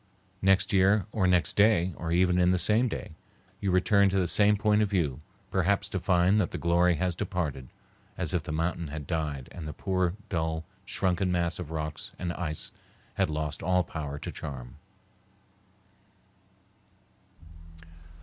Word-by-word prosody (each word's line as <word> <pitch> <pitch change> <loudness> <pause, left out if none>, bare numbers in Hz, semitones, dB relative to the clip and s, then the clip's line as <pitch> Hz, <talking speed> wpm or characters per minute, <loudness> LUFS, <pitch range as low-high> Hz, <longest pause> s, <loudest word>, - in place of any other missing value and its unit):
Next 95 +3 +3
year 95 +1 +4
or 100 -4 +1
next 90 -1 +2
day, 100 -4 +4
or 80 -1 -4
even 90 +1 +3
in 90 0 +4
the 90 - +3
same 110 +7 +3
day, 110 - -5 0.5
you 100 - -1
return 100 +2 +4
to 95 - 0
the 90 -2 +2
same 105 +5 +4
point 105 0 +3
of 105 - +1
view, 80 -9 -1 0.3
perhaps 100 +2 +1
to 95 - -2
find 90 +3 +3
that 90 - -1
the - - -5
glory 85 +1 +3
has 90 +1 -1
departed, 85 -10 -3 0.5
as - - -1
if 90 - +1
the 80 0 -6
mountain 85 +1 -1
had 75 0 -6
died 75 -5 -3
and 80 -3 -7
the 75 - -5
poor 95 +1 -1
dull, 80 -3 -2 0.2
shrunken 95 -1 0
mass 85 -2 0
of 85 -4 -6
rocks 75 -1 -4
and 85 -1 -3
ice 80 -4 -3 0.4
had 95 -3 0
lost 75 -1 -3
all 90 +1 +2
power 75 -4 -5
to - - -6
charm. 60 -3 -7
90 Hz, 160 wpm, -28 LUFS, 80-95 Hz, 0.5 s, year